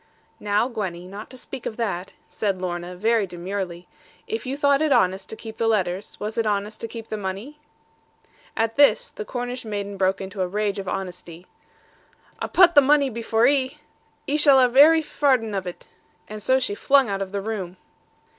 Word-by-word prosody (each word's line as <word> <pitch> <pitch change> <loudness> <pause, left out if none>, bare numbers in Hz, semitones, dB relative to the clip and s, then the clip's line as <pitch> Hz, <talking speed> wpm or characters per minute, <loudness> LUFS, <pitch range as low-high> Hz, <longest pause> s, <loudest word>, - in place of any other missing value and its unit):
'Now, 210 +3 +1
Gwenny, 190 -8 -5
not 200 +3 -9
to 255 - -10
speak 255 0 -7
of 220 - -6
that,' 195 -6 -3
said 195 -3 -2
Lorna, 175 0 -4
very 220 +2 +1
demurely, 180 0 -5 0.4
'if 445 - -4
you 270 +2 -3
thought 285 0 +3
it 310 -2 +1
honest 190 -6 +2
to - - -6
keep 220 0 -10
the 225 - 0
letters, 190 -3 -1
was 215 +2 -3
it 225 - +1
honest 210 +1 -2
to 230 - -3
keep 225 -1 -9
the 215 - -3
money?' 205 +10 -6 1.0
At 225 +1 0
this 290 - +4
the 450 - -6
Cornish 245 -6 -5
maiden 205 -2 -5
broke 190 0 +1
into 195 0 -5
a 185 - +1
rage 205 +1 -1
of 195 - -6
honesty: 180 -2 -6 1.0
'A - - -1
putt 360 -2 +5
the 285 - +8
money 280 -1 +3
by 230 +1 -5
for 225 0 +2
'ee. 270 +1 +2 0.5
'Ee 290 - 0
shall 285 -3 +6
have 250 -1 +3
every 315 +3 +7
farden 260 -8 +1
of 190 -2 -3
it.' 180 - -8 0.4
And 215 0 -8
so 260 +5 +3
she 255 -5 -2
flung 275 +4 +3
out 195 -1 -2
of 190 -1 -4
the 200 - -2
room. 195 -4 -5
215 Hz, 195 wpm, -23 LUFS, 190-260 Hz, 1.0 s, the